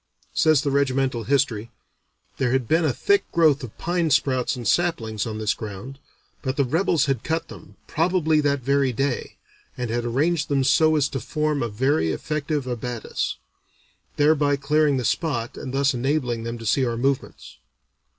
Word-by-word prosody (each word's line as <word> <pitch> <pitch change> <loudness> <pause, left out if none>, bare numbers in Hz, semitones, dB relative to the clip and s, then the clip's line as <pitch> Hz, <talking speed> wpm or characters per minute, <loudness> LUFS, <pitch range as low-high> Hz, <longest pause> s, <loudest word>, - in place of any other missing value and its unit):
Says 155 -3 +3
the 140 - 0
regimental 135 -4 0
history, 120 -5 0 0.7
"There 125 -2 0
had 130 -3 0
been 160 +4 +2
a 150 - +2
thick 400 - +1
growth 155 -5 +3
of 115 - -9
pine 170 -1 0
sprouts 130 -3 +1
and 120 -3 -5
saplings 115 -10 0
on 110 -1 -4
this 110 -1 0
ground, 110 +6 -8 0.4
but 130 -1 -3
the 140 - +3
rebels 165 +2 +1
had 135 -5 -1
cut 160 0 -2
them, - - -13
probably 160 -2 +1
that 140 -2 0
very 140 +1 +2
day, 135 +2 -2 0.4
and 125 -2 -3
had 120 0 -1
arranged 145 +7 0
them 140 -2 +2
so 155 +4 +4
as 145 -3 +2
to 135 - -3
form 150 +1 -1
a 120 - -1
very 105 - +1
effective 150 - -2
abatis, 120 -1 -3 0.8
thereby 145 -1 +3
clearing 145 0 +2
the 125 - -2
spot 120 -3 -1
and 130 - -6
thus 135 +1 +2
enabling 125 -2 -1
them 115 0 -4
to 115 - -9
see 130 +5 +2
our 120 -2 -1
movements. 135 +2 -2
135 Hz, 170 wpm, -23 LUFS, 120-150 Hz, 0.8 s, so